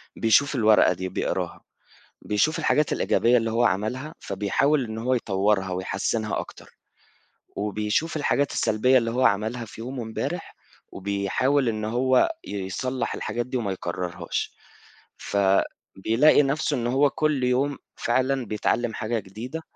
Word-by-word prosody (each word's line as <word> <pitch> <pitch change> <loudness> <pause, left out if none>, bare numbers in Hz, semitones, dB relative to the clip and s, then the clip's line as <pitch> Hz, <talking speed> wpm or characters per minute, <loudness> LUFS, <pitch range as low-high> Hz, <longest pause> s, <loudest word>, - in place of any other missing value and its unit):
بيشوف 140 +6 +3
الورقة 110 -6 +5
دي، 95 +1 -5
بيقراها، - - -3 0.6
بيشوف 105 +10 +1
الحاجات 150 -1 +2
الإيجابية 120 +1 +3
اللي 115 -1 0
هو 115 +2 +2
عملها، 120 +9 -1
فبيحاول 115 +9 0
إن 110 -1 -6
هو 125 +3 0
يطوّرها 100 -4 +1
ويحسنها 100 +4 -2
أكتر - - -11 0.8
وبيشوف 105 +10 -1
الحاجات 145 -1 +1
السلبية 125 +5 +3
اللي 115 -2 -1
هو 125 +3 -1
عملها 110 +3 0
في 110 - -12
يومه 125 +2 -5
امبارح 110 -1 -5 0.4
وبيحاول 100 +8 0
إن 110 -1 -2
هو 130 - +2
يصلح 105 +7 -3
الحاجات 120 0 -3
دي 130 - -4
وما 110 -6 -1
يكررهاش، 90 -1 -4 0.6
فبيلاقي 100 +7 +2
نفْسه 145 +1 0
إن 120 -1 -1
هو 135 +4 +3
كل 150 -2 0
يوم 130 +3 +1 0.2
فعلًا 130 +1 0
بيتعلم 110 +2 -1
حاجة 110 +1 -2
جديدة. 110 +10 -7
115 Hz, 130 wpm, -25 LUFS, 105-130 Hz, 0.8 s, الورقة